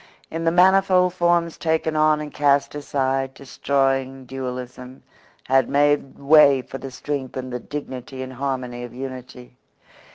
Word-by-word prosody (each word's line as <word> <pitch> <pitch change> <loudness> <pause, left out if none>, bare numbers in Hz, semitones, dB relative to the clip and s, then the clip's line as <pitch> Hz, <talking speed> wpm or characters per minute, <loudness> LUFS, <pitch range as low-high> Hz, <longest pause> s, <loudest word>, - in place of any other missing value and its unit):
In 165 +1 -4
the 165 - +3
manifold 185 0 +4
forms 170 -1 +1
taken 160 -1 0
on 155 0 +3
and 150 -1 -7
cast 140 -1 +2
aside 135 -2 -2
destroying 135 -1 -1
dualism 125 0 -7 0.4
had 135 0 +2
made 145 -1 +1
way 140 -2 +5
for 135 - -8
the 135 - -7
strength 135 0 -5
and 130 -1 -5
the 125 - -3
dignity 130 -2 -7
and 130 0 -8
harmony 130 -2 -4
of 120 0 -9
unity. 125 -1 -9
135 Hz, 140 wpm, -22 LUFS, 130-150 Hz, 0.4 s, way